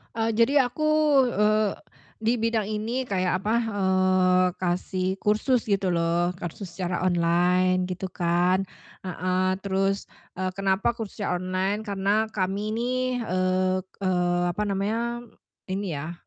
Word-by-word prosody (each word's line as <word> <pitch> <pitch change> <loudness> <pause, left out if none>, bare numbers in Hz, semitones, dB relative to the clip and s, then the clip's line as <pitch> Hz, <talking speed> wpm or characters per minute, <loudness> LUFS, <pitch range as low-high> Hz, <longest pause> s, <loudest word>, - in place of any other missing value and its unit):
Eee, 225 0 0
jadi 275 +5 +5
aku, 305 +5 -3 0.4
eee, 215 -2 +2 0.5
di 230 +2 +2
bidang 225 -2 0
ini 220 +4 -2
kayak 185 -5 0
apa, 215 +3 0 0.2
eee, 185 -1 +3
kasih 185 +1 -1
kursus 215 +5 +1
gitu 195 -3 +1
loh, 170 0 +1
kursus 175 +2 -6
secara 175 +1 -3
online 180 +1 +2
gitu 185 +1 -4
kan, 175 +2 +2 0.4
heeh. 185 +1 -1
Terus, 195 +1 0 0.3
eee, 185 0 -2
kenapa 195 +4 +1
kursus 225 -4 -7
secara 180 -4 -1
online, 185 +3 -1
karena 205 +1 0
kami 195 -1 -2
ini, 240 +3 -1 0.3
eee 185 0 +1 0.2
eee, 175 -1 +1
apa 210 - -3
namanya, 230 +5 -2 0.4
ini 190 -4 -3
ya 155 +4 -5
190 Hz, 130 wpm, -25 LUFS, 185-215 Hz, 0.5 s, jadi